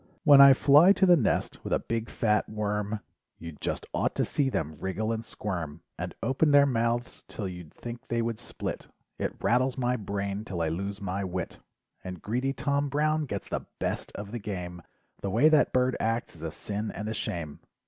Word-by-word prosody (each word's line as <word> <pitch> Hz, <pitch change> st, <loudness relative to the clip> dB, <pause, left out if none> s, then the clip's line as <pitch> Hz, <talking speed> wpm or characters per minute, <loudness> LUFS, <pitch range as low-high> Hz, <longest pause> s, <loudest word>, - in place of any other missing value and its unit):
When 145 Hz, -2 st, +9 dB
I 140 Hz, -1 st, +10 dB
fly 150 Hz, +8 st, +7 dB
to 195 Hz, -, +3 dB
the 180 Hz, -1 st, +7 dB
nest 135 Hz, -10 st, 0 dB
with -, -, -5 dB
a -, -, +4 dB
big 115 Hz, -1 st, -3 dB
fat 105 Hz, -2 st, +1 dB
worm 105 Hz, 0 st, -2 dB, 0.4 s
You 85 Hz, 0 st, -7 dB
just 75 Hz, -, -4 dB
ought -, -, 0 dB
to -, -, +1 dB
see 140 Hz, -2 st, 0 dB
them 80 Hz, -, -3 dB
wriggle 110 Hz, +4 st, -2 dB
and 115 Hz, 0 st, -2 dB
squirm, 85 Hz, -9 st, -5 dB
And -, -, -5 dB
open 135 Hz, +4 st, +2 dB
their 145 Hz, -1 st, +7 dB
mouths 120 Hz, -2 st, -1 dB
'till 100 Hz, -, -5 dB
you'd 90 Hz, -4 st, -8 dB
think 120 Hz, 0 st, -8 dB
they 115 Hz, 0 st, 0 dB
would 115 Hz, -2 st, -2 dB
split, -, -, -5 dB, 0.3 s
It -, -, -2 dB
rattles 125 Hz, +2 st, +2 dB
my 125 Hz, -1 st, +1 dB
brain 100 Hz, -1 st, -3 dB
'till 95 Hz, -5 st, -5 dB
I 80 Hz, -, +1 dB
lose 100 Hz, +5 st, -4 dB
my 100 Hz, +1 st, -2 dB
wit. 90 Hz, -2 st, -4 dB, 0.4 s
And 90 Hz, -1 st, -6 dB
greedy 125 Hz, +8 st, -1 dB
Tom 140 Hz, +1 st, 0 dB
Brown 155 Hz, +2 st, +1 dB
gets -, -, -5 dB
the -, -, -4 dB
best -, -, -3 dB
of 100 Hz, 0 st, -6 dB
the 120 Hz, -, -4 dB
game, 90 Hz, -4 st, -5 dB, 0.4 s
The 100 Hz, -, -2 dB
way 150 Hz, +11 st, +5 dB
that 155 Hz, -2 st, +4 dB
bird 130 Hz, 0 st, +2 dB
acts 115 Hz, -3 st, -1 dB
is 80 Hz, -, -14 dB
a 80 Hz, -, -3 dB
sin 105 Hz, +6 st, -4 dB
and 105 Hz, -, -5 dB
a 110 Hz, -, -2 dB
shame." 80 Hz, -8 st, -4 dB
110 Hz, 200 wpm, -28 LUFS, 95-130 Hz, 0.4 s, I